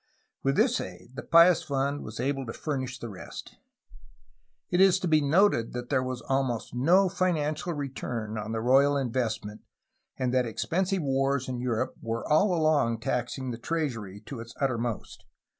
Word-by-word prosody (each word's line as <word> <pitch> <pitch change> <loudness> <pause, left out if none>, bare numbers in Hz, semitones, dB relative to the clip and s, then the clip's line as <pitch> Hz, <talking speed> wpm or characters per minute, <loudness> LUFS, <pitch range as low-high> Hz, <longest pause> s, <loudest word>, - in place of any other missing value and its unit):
With 135 0 +1
this 240 - +3
aid 95 +6 -9
the - - -6
Pious 170 +1 +6
Fund 140 +1 -1
was 110 - -8
able 135 0 -1
to 115 - -5
furnish 130 -4 -3
the 120 - -7
rest. 100 -5 -9 1.1
It 180 +1 +3
is 190 -1 +6
to 185 - -2
be 155 -2 +4
noted 145 - +3
that 125 0 -5
there 130 -2 +2
was 130 -1 -4
almost 135 -4 -1
no 175 +10 +4
financial 175 -3 -1
return 125 -6 -4
on 110 0 -4
the 110 0 -2
royal 135 +4 +4
investment 115 -5 -2 0.6
and 130 -1 -1
that 125 -1 +2
expensive 185 - -1
wars 135 -1 0
in 125 -1 -3
Europe 120 -3 -1
were 115 0 -3
all 170 +7 +4
along 155 -9 +2
taxing 125 +2 -2
the 115 - -6
treasury 115 - -3
to 120 +3 -8
its 115 +1 -9
uttermost. 120 -5 -2
135 Hz, 165 wpm, -28 LUFS, 120-155 Hz, 1.1 s, Pious